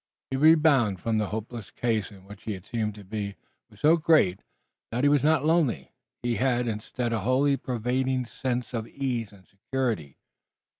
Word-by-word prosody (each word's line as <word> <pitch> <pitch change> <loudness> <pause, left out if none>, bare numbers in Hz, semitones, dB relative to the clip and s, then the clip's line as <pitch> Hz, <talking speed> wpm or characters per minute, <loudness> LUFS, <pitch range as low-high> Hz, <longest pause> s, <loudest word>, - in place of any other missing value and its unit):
The 135 - 0
rebound 145 - +5
from 110 +1 0
the 105 - 0
hopeless 110 +1 -6
case 110 -4 -1
in 95 -2 -15
which 105 +1 -12
he 110 - -2
had 95 -1 -9
seemed 110 -2 -2
to 105 - -11
be 100 0 -4 0.3
was - - -19
so 160 +3 +6
great 155 - +3 0.5
that 120 +3 -2
he 145 - +5
was 145 -1 +3
not 155 -1 +3
lonely. 160 -6 +1 0.3
He 120 -1 0
had 125 -2 +1
instead 115 +2 -3
a 115 - 0
wholly 130 +6 +2
pervading 130 +1 -1
sense 125 +1 -3
of 115 -1 -3
ease 125 -6 -3
and 95 -3 -18
security. 100 - -3
120 Hz, 180 wpm, -27 LUFS, 105-135 Hz, 0.5 s, so